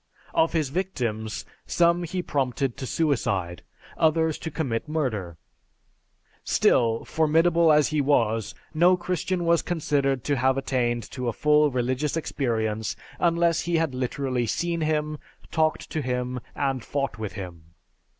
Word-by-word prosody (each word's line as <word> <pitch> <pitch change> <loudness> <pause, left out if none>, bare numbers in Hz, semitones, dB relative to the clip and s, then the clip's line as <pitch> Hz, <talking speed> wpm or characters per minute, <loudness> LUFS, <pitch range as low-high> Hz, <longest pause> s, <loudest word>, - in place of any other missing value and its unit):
Of 165 - +2
his 155 -5 +1
victims, 125 - -3 0.2
some 170 0 +3
he 180 +2 -3
prompted 135 -3 -1
to 135 -2 -6
suicide, 100 - 0 0.4
others 160 0 +2
to 160 - -4
commit 145 -4 -3
murder. 110 - -2 1.1
Still, 115 -1 +2
formidable 165 +1 +3
as 150 -1 +4
he 155 -1 +1
was, 115 -6 +1 0.2
no 175 +3 +5
Christian 180 0 -2
was 170 0 +4
considered 140 -6 0
to 145 +1 0
have 130 +2 +2
attained 120 -3 0
to 125 -2 -4
a 120 - 0
full 150 +4 +4
religious 130 +4 -1
experience 110 -8 -1 0.2
unless 170 -1 +2
he 170 0 -1
had 160 -4 +1
literally 130 -1 -1
seen 170 +8 -1
him, 155 -1 -1 0.3
talked 155 -1 +1
to 155 - -1
him, 125 -1 -2 0.2
and 135 -4 -1
fought 140 -4 -3
with 110 -2 -4
him. 85 -4 -8
140 Hz, 140 wpm, -25 LUFS, 120-160 Hz, 1.1 s, no